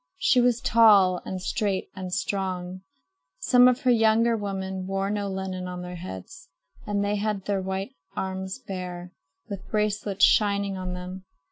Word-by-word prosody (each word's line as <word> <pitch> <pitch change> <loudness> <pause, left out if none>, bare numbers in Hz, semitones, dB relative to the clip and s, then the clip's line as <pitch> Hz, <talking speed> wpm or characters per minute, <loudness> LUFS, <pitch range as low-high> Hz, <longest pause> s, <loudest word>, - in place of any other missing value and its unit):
She 250 - +4
was 240 -1 +2
tall 205 -6 +5
and 190 - -4
straight 195 +1 -2
and 185 -1 -6
strong. 185 -1 -3 0.6
Some 250 0 +5
of 250 +2 +2
her 255 -3 +3
younger 230 0 +4
women 190 -3 -4
wore 195 +1 -1
no 205 -1 -2
linen 190 -1 -4
on 180 0 -6
their 180 0 -7
heads 145 - -9 0.4
and 205 -1 0
had 205 -1 -1
their 200 -2 0
white 190 +1 -4 0.2
arms 190 +1 -4
bare, 180 -5 -7 0.3
with 195 -2 -8
bracelets 210 -2 +2
shining 200 -2 +2
on 185 -1 -4
them. 185 +1 -7
195 Hz, 150 wpm, -26 LUFS, 185-210 Hz, 0.6 s, tall